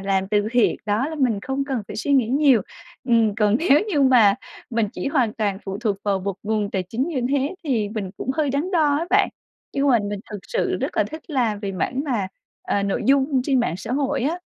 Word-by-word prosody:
làm 195 0 0
từ 210 0 +1
thiện. 245 -2 +3
Đó, 215 +7 +1
là 320 - -5
mình 230 -7 +1
không 270 +3 -2
cần 265 -5 -2
phải - - -6
suy 285 +6 -1
nghĩ 250 -5 +3
nhiều. 270 -5 +4 0.5
Ừm, 225 -3 +3
còn 210 0 +3
nếu 300 -3 +4
như 310 -8 +1
mà 235 -7 +6 0.4
mình 225 -3 0
chỉ - - -5
hoàn 255 -7 +1
toàn 205 -4 -1
phụ 195 0 -4
thuộc 215 -4 0
vào 200 -2 +1
một 195 0 -3
nguồn 210 -1 -1
tài 190 - -1
chính 250 - -1
như 300 -7 -2
thế 280 +2 0
thì 230 -8 0
mình 205 -3 -4
cũng - - -3
hơi 300 -3 +1
đắn 285 +7 -1
đo 305 -6 +3
á 335 - -2
bạn, 400 +2 +4 0.4
nhưng 280 +1 +1
mà 245 -3 +5
mình 205 -1 -4
thực 210 - -5
sự 485 - 0
rất - - -3
là - - +3
thích 315 0 -8
làm 235 -7 0
về 200 -2 -3
mảng 240 +8 -2
mà, 230 -10 -1 0.3
ờ, 200 - 0
nội 200 -1 -1
dung 275 -1 +3
trên 265 -2 +2
mạng 205 -8 -1
xã 220 +5 -6
hội 280 0 0
á. 315 +7 0
240 Hz, 240 wpm, -22 LUFS, 205-280 Hz, 0.5 s, mà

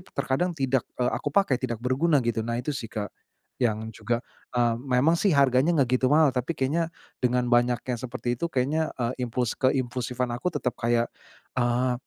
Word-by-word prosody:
"terkadang 175 +7 0
tidak, 135 -3 0
eee, 125 -1 +1
aku - - -3
pakai 165 -11 +3
tidak 120 -3 -4
berguna" 140 +2 +2
gitu, 115 -1 0
nah 115 +1 -2
itu 125 +5 -2
sih 120 -5 -5
Kak, 105 -2 -5 0.5
yang 110 -2 0
juga, 115 +2 -2 0.3
eee, 120 -1 +3
memang 135 +6 +2
sih 190 -8 +3
harganya 140 +4 +4
enggak 130 -4 +2
gitu 130 - +3
mahal, 150 +1 +5
tapi 130 +6 -2
kayaknya 155 +6 0 0.3
dengan 125 0 +2
banyak 120 0 +4
yang 120 -2 -1
seperti 120 -1 -3
itu, 170 - 0
kayaknya, 150 +5 +1
eee, 125 0 -2
impuls 120 0 -1
keimpulsifan 125 -1 0
aku 120 +8 -3
tetep 125 - -1
kayak, 120 0 +1 0.5
eee, 125 +1 +2
125 Hz, 180 wpm, -26 LUFS, 120-135 Hz, 0.5 s, mahal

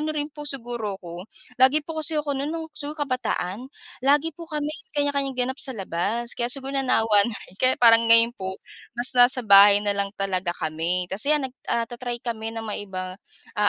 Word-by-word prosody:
ano 310 0 -3
rin 295 0 -3
po 295 -1 -8
siguro 235 -6 -5
ako, 175 +2 -10 0.3
lagi 290 +4 +4
po 320 0 -5
kasi 310 +1 -1
ako 295 -1 -1
nun 275 +2 -3
no'ng 325 0 -4
siguro 300 +1 -7
kabataan 255 -3 -3 0.3
lagi 290 +4 +2
po 335 +2 -11
kami 300 -1 -3 0.2
kanya-kanyang 280 -2 0
ganap 260 +2 -2
sa 260 -4 -3
labas 200 +6 -2
kaya 240 0 -1
siguro 270 +1 -4
nanawa 225 -6 +3
na 225 - -5
rin 185 - -18
kaya 255 0 +4
parang 230 -1 +6
ngayon 230 +1 +6
po 190 -4 -6 0.4
mas 240 +1 -1
nasa 245 0 +5
bahay 200 0 +7
na 205 - +2
lang 200 0 -1
talaga 190 -2 -2
kami. 165 +3 -2
Kasi 215 +9 -2
'yan 290 - -2
nag - - -22 0.2
ah, 235 0 0
ta-try 240 0 -6
kami 225 -1 -4
na 225 - -5
maiba, 190 -2 -6 0.4
ah, 210 0 +4
240 Hz, 195 wpm, -24 LUFS, 200-280 Hz, 0.4 s, bahay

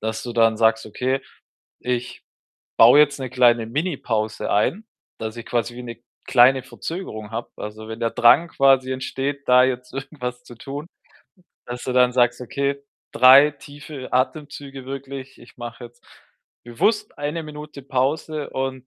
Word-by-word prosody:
dass 110 0 -3
du 120 - -6
dann 115 -1 +3
sagst: 110 0 +3
„Okay, 130 +5 -1 0.6
ich 125 0 -4 0.5
baue 120 +5 +8
jetzt 145 -2 +4
'ne 130 -2 -4
kleine 120 -2 +3
Minipause 115 - -2
ein, 170 - +1 0.3
dass 110 +1 -5
ich 115 - -8
quasi 120 0 -2
wie 125 - -7
'ne 120 -1 -9 0.2
kleine 130 +1 +5
Verzögerung 120 - -7
habe“ 115 +1 -5
also, 110 +1 -8
wenn 110 +1 -7
der 115 -1 0
Drang 125 +10 +5
quasi 135 -3 +3
entsteht, 135 +2 -4
da 125 0 +7
jetzt 125 -1 -3
irgendwas 125 -3 -6
zu 120 - -13
tun, 140 +5 -7 0.8
dass 120 0 -6
du 130 - -2
dann 125 0 +4
sagst: 120 0 +2
„Okay, 140 +3 -2 0.3
3 135 +4 +8
tiefe 145 -1 -11
Atemzüge 135 0 -2
wirklich. 135 0 -7
Ich 120 - -17
mache 120 0 -8
jetzt 120 0 -15 0.6
bewusst 210 - 0
1 150 +3 -3
Minute 150 -1 -9
Pause“, 140 +3 -2
und 130 -1 -4
130 Hz, 155 wpm, -22 LUFS, 120-140 Hz, 0.8 s, baue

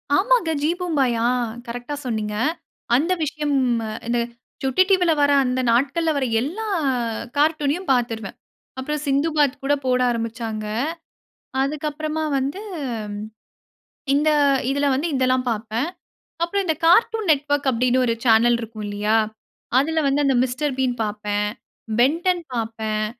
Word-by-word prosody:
ஆமாங்க 420 -4 +3
"ஜீ 310 - +3
பூம்பாயா" 270 -10 +1 0.4
கரெக்ட்டா 245 +5 -5
சொன்னீங்க. 215 -3 -2 0.6
அந்த 330 +8 +2
விஷயம் 295 -1 -1 0.5
இந்த 240 0 +1 0.4
சுட்டி 265 +8 +4
டிவில 360 -3 +4
வர்ற 285 0 +4
அந்த 250 +1 0
நாட்கள்ல 285 +7 +2
வர்ற 270 -2 0 0.2
எல்லா 370 - -4 0.7
கார்ட்டூன்யும் 305 +2 +1
பாத்துடுவேன். 230 -5 -1 0.4
அப்புறம் 300 +2 -3
"சிந்து 280 +4 +2
பாத்" 285 -2 +3
கூட 285 +1 +2
போட 250 0 +2
ஆரம்பிச்சாங்க. 225 -2 -4 1.0
அதுக்கு 300 +2 -1
அப்புறமா 310 +1 -3
வந்து, 280 +10 -2 1.5
இந்த 300 +2 +3 0.4
இதில 285 +1 +1
வந்து 300 +6 -1
இதெல்லாம் 255 0 +2
பார்ப்பேன். 225 +6 -2 0.6
அப்புறம் 390 +3 0
இந்த 320 -2 +1
'கார்ட்டூன் 435 +2 +4
நெட்வொர்க்' 290 -1 +1
அப்படின்னு 250 +2 +2
ஒரு 230 - +1
சேனல் 235 +1 +5
இருக்கும் 220 -2 -6
இல்லையா. 210 +2 +1 0.6
அதில 320 +3 +1
வந்து 285 +1 +2
அந்த 270 -2 +3
'மிஸ்டர் 260 +2 -2
பீன்' 245 -2 0
பார்ப்பேன். 210 0 -2 0.5
"பென்டன்" 340 +6 +2
பார்ப்பேன். 220 -2 -2
270 Hz, 125 wpm, -22 LUFS, 235-310 Hz, 1.5 s, சேனல்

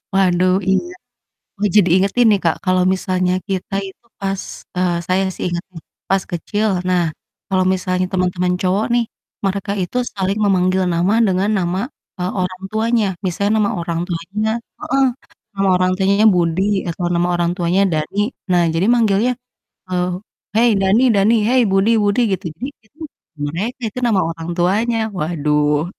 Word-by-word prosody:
Waduh, 185 -1 +3
iya. 350 - 0 0.7
Oh, 205 - +2
jadi 195 -4 +5
inget 190 +1 +2
ini, 220 -3 +6
Kak, 165 -2 +2
kalau 185 0 +3
misalnya 185 -1 0 0.2
kita 190 0 -3
itu 190 +4 -15
pas 195 -1 -2 0.4
eee, 180 -1 +1
saya 185 +1 +2
sih - - -6
inget 175 0 -3 0.5
pas 195 -1 +2
kecil, 205 +5 -1 0.2
nah, 180 -1 +2 0.5
kalau 185 -1 +2
misalnya 185 0 -1
teman-teman 180 -1 0
cowok 190 +3 +1
nih, 240 -1 +2 0.4
mereka 195 0 -1
itu 180 +7 -3 0.2
saling 195 0 -1
memanggil 185 -1 +2
nama 175 +4 +2
dengan 190 +2 +1
nama, 180 0 -1 0.4
eee, 180 +1 -1
orang 185 0 -3
tuanya. 220 0 +1 0.2
Misalnya 200 +3 0
nama 210 -2 +2
orang 170 -1 -2
tuanya 195 +5 -2 0.3
heeh, 270 +2 +1 0.5
nama 195 0 +1
orang 185 0 +2
tuanya 200 +3 +2
Budi 170 +1 +1 0.3
atau 170 +2 -4
nama 175 +1 +1
orang 175 0 +1
tuanya 175 +2 +1
Dani, 155 +4 -2 0.3
nah, 175 -1 +4
jadi 165 +3 +1
manggilnya, 225 0 +2 0.6
eee, 180 -1 0 0.5
"Hei, 235 +2 +5
Dani 195 +6 +3
Dani! 205 +4 +4
Hei, 255 +2 +4
Budi 195 +3 +3
Budi!" 205 +4 +2
Gitu. 190 - -4
Jadi 160 +11 -7 0.2
itu, 250 +9 -30 0.5
mereka 205 - -4
itu 230 - -6
nama 205 -5 +2
orang 165 0 -6
tuanya, 210 +7 +1 0.2
waduh. 150 -2 +1
185 Hz, 155 wpm, -18 LUFS, 180-205 Hz, 0.7 s, ini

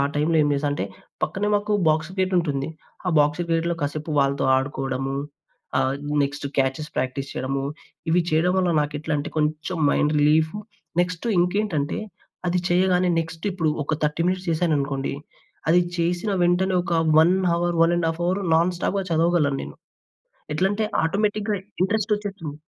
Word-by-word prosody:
టైమ్‌లో 155 +3 +2
ఏం - - +2
జేశా 145 +1 0
అంటే, 120 -9 -2 0.4
పక్కనే 205 +2 -1
మాకు 205 +1 +1
బాక్స్ 160 +2 +2
గేటుంటుంది. 175 -7 +1 0.4
ఆ - - +3
బాక్స్ 150 +3 +2
గేట్‌లో 165 +1 +1
కాసేపు 150 +2 -3
వాళ్ళతో 140 0 +2
ఆడుకోడము, 135 0 -2 0.6
ఆహ్, 130 0 +2 0.3
నెక్స్ట్ 140 +1 -3
క్యాచెస్ 135 +3 0
ప్రాక్టీస్ 130 +2 -2
చెయడము, 135 +1 -2 0.5
ఇవి 175 +2 +4
చెయడం 160 +3 +2
వల్ల 180 -2 +2
నాకెట్లంటే, 150 0 -2
కొంచం 155 +3 -1
మైండ్ 150 +1 +2
రిలీఫు. 155 +5 +3 0.4
నెక్స్టు 180 +4 -3
ఇంకేంటంటే, 180 -5 0 0.5
అది 180 +1 +1
చెయ్యగానే 180 0 +3
నెక్స్ట్ 165 +1 -6
ఇప్పుడు 170 -4 0 0.2
ఒక 155 - -1
30 150 +2 0
మినిట్స్ 185 0 -1
చేశాననుకోండి, 145 -5 0 0.6
అది 175 +2 +6 0.2
చేసిన 175 +4 0
వెంటనే 180 +2 +2
ఒక 175 - -2 0.3
1 170 +3 +5 0.2
హవర్, 170 0 0
1:30 165 0 +1
అవరు 185 +3 0
నాన్ 175 +2 +2
స్టాప్‌గా 195 +1 -1
చదవగలను 165 -4 +2
నేను. - - -9 0.8
ఎట్లంటే, 200 +3 +1 0.2
ఆటోమేటిక్‌గా 205 +3 0 0.3
ఇంట్రస్టొచ్చేస్తుంది. 205 -6 -2
165 Hz, 135 wpm, -24 LUFS, 145-180 Hz, 0.8 s, అది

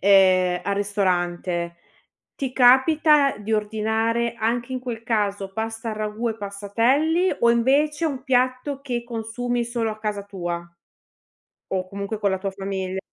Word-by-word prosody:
ehm, 185 -2 +5
al 200 - 0
ristorante, 175 -4 -1 0.6
ti 265 -2 -3
capita 280 +3 +5
di 210 +1 -5
ordinare 220 +2 0
anche 240 +3 -1
in 255 - -1
quel 240 -3 -6
caso, 205 -4 -1
pasta 225 +1 -4
al 215 - -5
ragù 215 +2 -2
e 220 - -3
passatelli 235 - +1
o 235 - +5
invece 285 +7 +2
un 270 -5 -3
piatto 255 +2 0
che 245 -4 -3
consumi 240 +1 -3
solo 235 -1 -2
a 215 - -7
casa 210 -2 -3
tua? 175 -4 -5 1.1
O 185 -1 -1
comunque 200 +2 -4
con 205 -1 +2
la 190 - 0
tua 195 +1 -3
famiglia. 190 -1 -4
220 Hz, 145 wpm, -23 LUFS, 200-245 Hz, 1.1 s, ehm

